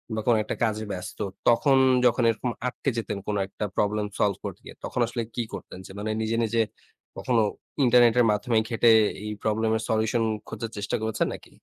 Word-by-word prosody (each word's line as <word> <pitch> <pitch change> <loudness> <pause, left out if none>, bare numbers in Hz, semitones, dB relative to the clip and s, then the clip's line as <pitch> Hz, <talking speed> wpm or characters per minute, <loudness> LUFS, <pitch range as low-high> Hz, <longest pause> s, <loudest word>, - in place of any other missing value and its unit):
বা 110 - -1
কোন 120 - +5
একটা - - -4
কাজে 110 -1 0
ব্যস্ত। 90 0 -7 0.3
তখন 135 +4 +4 0.3
যখন 120 0 +3
এরকম 115 +2 -1 0.2
আটকে 135 - -2
যেতেন 105 -3 -3
কোন 105 - -1
একটা 105 - -5
প্রবলেম 105 0 +1
সলভ 100 -2 +2
করতে - - -6
গিয়ে। - - -10
তখন - - -4
আসলে 120 0 -3
কী 120 - 0
করতেন? 95 -1 -8
যে - - -11
মানে 110 +1 -2
নিজে, 110 +1 -1
নিজে, 115 +1 +1 0.6
কখনো 120 -3 +1 0.4
ইন্টারনেটের 120 0 +5
মাধ্যমে 110 +2 0
ঘেটে 115 0 +4 0.3
এই 105 - -4
প্রবলেম 110 +1 +1
এর - - -5
সলিউশন 110 +1 +1 0.2
খোঁজার 110 0 -5
চেষ্টা 100 0 -2
করেছেন 110 0 0
নাকি? - - -11
110 Hz, 185 wpm, -26 LUFS, 105-120 Hz, 0.6 s, কোন